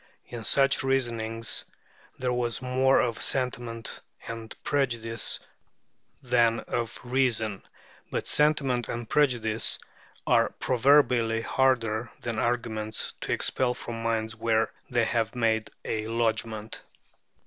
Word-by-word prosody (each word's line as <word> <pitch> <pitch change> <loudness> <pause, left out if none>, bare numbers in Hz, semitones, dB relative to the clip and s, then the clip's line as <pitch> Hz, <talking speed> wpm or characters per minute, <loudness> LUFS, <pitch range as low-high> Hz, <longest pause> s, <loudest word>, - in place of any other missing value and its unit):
In 120 -2 -7
such 135 +5 +3
reasonings 115 -4 0 0.5
there 125 -1 -1
was 120 -1 0
more 130 +1 +3
of 115 -2 0
sentiment 120 -3 -1 0.3
and 115 -1 -6
prejudice 115 -5 -1 0.8
than 120 -2 +3
of 115 -1 -3
reason, 120 -5 +1 0.5
but - - -2
sentiment 140 -5 +2
and 120 -1 -4
prejudice 120 -7 +2 0.5
are - - +4
proverbially 125 -3 +3
harder 115 -3 +1
than 115 -2 -3
arguments 110 -2 -1
to - - -3
expel 125 -1 +2
from 115 -1 -6
minds 115 0 -1
where 115 0 +1 0.2
they 120 -3 +2
have 115 +1 0
made 110 -2 +1 0.2
a 110 -1 -2
lodgment. 115 -1 -2
115 Hz, 110 wpm, -27 LUFS, 115-125 Hz, 0.8 s, are